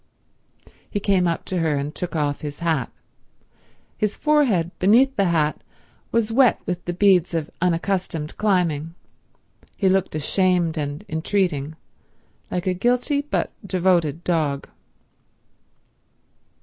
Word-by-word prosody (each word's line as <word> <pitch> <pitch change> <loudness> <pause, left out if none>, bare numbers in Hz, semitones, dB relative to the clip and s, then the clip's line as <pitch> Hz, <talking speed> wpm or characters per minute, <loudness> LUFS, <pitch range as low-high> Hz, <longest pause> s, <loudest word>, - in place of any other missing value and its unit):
He 205 - -2
came 190 -3 +2
up 170 - -2
to 185 - -2
her 160 -3 +1
and 140 +2 -3
took 175 -1 -5
off 145 -2 -1
his 145 -1 -6
hat. 160 -7 -1 1.1
His 210 -1 0
forehead 255 - +2
beneath 245 +8 +4
the 200 - +2
hat 155 -4 +1 0.5
was 230 -1 +1
wet 250 0 +4
with 180 -1 -3
the 175 - -2
beads 180 -2 +3
of 160 -2 -2
unaccustomed 175 -3 -1
climbing. 170 -6 0 0.8
He 195 - +2
looked 190 -4 +1
ashamed 175 +1 +1
and 150 +5 -4
entreating, 160 -3 -1 0.7
like 180 - -3
a 185 - +1
guilty 245 - +1
but 290 - -2
devoted 175 -4 +1
dog. 150 -5 0
175 Hz, 125 wpm, -22 LUFS, 160-200 Hz, 1.1 s, beneath